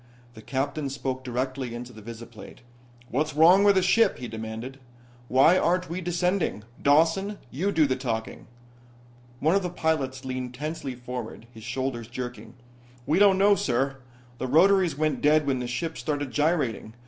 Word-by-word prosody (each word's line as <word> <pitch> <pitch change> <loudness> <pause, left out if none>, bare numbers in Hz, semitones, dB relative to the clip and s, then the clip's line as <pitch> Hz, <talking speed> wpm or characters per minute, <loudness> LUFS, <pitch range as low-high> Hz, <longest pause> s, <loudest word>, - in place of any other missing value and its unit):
The 110 - -12
captain 140 +4 -2
spoke 130 -1 -4
directly 130 0 -3
into 125 +1 -8
the 110 - -12
visiplate. 115 +1 -11 0.5
"What's 150 +3 -1
wrong 175 +6 +6
with 200 -1 +5
the 190 - +3
ship?" 215 +3 +3
he 125 - -6
demanded. 110 +4 -7 0.5
"Why 140 +9 +5
aren't 180 0 0
we 180 +2 -3
descending? 175 - -1 0.2
Dawson, 165 +8 +3
you 185 +10 -1
do 160 -5 +3
the 130 -2 0
talking!" 115 -4 -4 0.9
One 155 +4 +3
of 200 - +3
the 180 - -3
pilots 140 -6 -2
leaned 130 -1 -4
tensely 145 -2 -5
forward, 120 -2 -7
his 110 -2 -12
shoulders 125 -1 -3
jerking. 125 -1 -7 0.5
"We 160 +5 +2
don't 200 -2 +6
know, 200 +1 +5
sir. 135 -5 0 0.4
The 130 - -2
rotaries 175 +2 +4
went 155 -3 0
dead 150 +1 +4
when 135 -2 0
the 125 - -3
ship 160 +7 -3
started 145 -3 -3
gyrating. 145 -8 0
135 Hz, 160 wpm, -26 LUFS, 125-165 Hz, 0.9 s, wrong